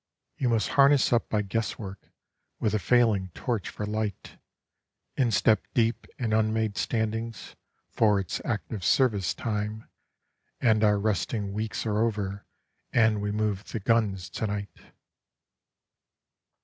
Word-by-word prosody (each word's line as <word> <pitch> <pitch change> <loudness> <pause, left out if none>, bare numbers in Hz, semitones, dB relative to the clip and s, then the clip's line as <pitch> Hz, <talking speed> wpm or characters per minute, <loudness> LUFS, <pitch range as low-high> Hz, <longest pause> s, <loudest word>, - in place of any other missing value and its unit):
(You 125 - 0
must 115 -2 +1
harness 140 -2 +5
up 120 - +1
by 105 -1 +1
guesswork 100 -1 -4 0.5
with 110 - 0
a 110 - +2
failing 105 -2 +3
torch 115 -6 -2
for 105 - -5
light, 105 -1 -4 0.8
Instep 110 -4 +3
deep 115 0 +1
in 115 -4 -1
unmade 110 -1 +1
standings, 110 +2 -2 0.4
for 105 -3 +3
it's 90 -4 -3
active 105 -2 -3
service 105 -9 +2
time, 105 0 -3 0.7
And 110 -2 +3
our 105 -1 +4
resting 100 0 -1
weeks 110 +2 -3
are 105 -1 0
over, 105 -3 -1 0.4
and 110 -3 +3
we 105 0 -1
move 105 -1 -1
the 115 - -2
guns 100 -4 +1
to 110 - -2
night.) 100 0 -5
110 Hz, 125 wpm, -27 LUFS, 100-115 Hz, 0.8 s, harness